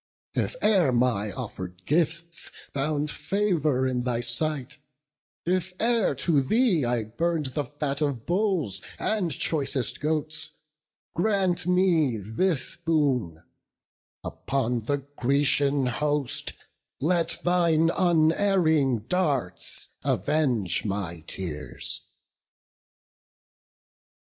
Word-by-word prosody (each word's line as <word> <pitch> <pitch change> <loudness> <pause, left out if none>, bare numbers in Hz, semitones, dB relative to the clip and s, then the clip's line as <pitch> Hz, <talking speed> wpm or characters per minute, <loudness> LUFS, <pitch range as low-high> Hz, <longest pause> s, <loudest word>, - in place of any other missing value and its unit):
if - - -1
e'er 185 -10 +4
my 120 -4 +1
offered 90 0 -7
gifts 170 +2 0 0.2
Found 150 +1 0
favour 155 -6 0
in 130 -1 0
thy 120 -1 -1
sight; 130 +3 -1 0.7
if 185 +1 -1
e'er 230 -9 +2
to 140 +2 +2
thee 200 - +3
I 120 -1 +1
burn'd 150 +5 -1
the 145 +1 -1
fat 145 +1 -3
of 140 -6 -1
bulls 180 - 0 0.2
and 210 -5 0
choicest 135 -4 -1
goats, 155 0 -2 0.6
Grant 180 -2 +1
me 175 -9 +3
this 125 - 0
boon—upon 140 - 0 1.4
the 140 +1 -1
Grecian 140 +1 +2
host 145 +1 -1 0.5
Let 170 +3 +1
thine 170 -2 +3
unerring 160 - +3
darts 145 - -1
avenge 125 - +1
my 95 -5 -3
tears." 75 -6 -4
150 Hz, 90 wpm, -26 LUFS, 125-170 Hz, 1.4 s, e'er